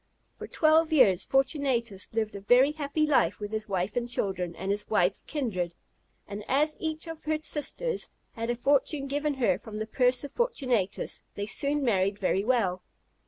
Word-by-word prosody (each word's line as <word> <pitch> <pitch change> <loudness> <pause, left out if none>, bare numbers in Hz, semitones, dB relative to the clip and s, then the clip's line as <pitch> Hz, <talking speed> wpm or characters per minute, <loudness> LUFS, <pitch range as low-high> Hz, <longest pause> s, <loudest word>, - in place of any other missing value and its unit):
For - - -6
twelve 315 0 +3
years 225 - +5
Fortunatus 265 -7 0
lived 220 -2 -2
a 200 - -6
very 250 +7 +5
happy 300 0 -1
life 205 - +2
with 205 0 -5
his 215 -1 -4
wife 190 +1 -1
and 240 0 -1
children, 185 -7 -2
and 195 - -3
his 205 +1 -2
wife's 190 -2 +2
kindred; 185 - -3 0.5
and 205 +1 -6
as 300 +4 +2
each 315 -1 -2
of 325 -1 -9
her 310 0 +1
sisters 400 - -2 0.2
had 230 +1 -5
a 240 - +1
fortune 275 +3 +1
given 290 +1 -1
her 200 -9 +1
from 220 -2 -9
the 215 - -2
purse 250 +3 +2
of 285 - -7
Fortunatus, 255 - -1
they 205 - -3
soon 280 +7 +1
married 200 -3 +1
very 195 -1 0
well. 205 -7 +1
240 Hz, 175 wpm, -28 LUFS, 200-290 Hz, 0.5 s, years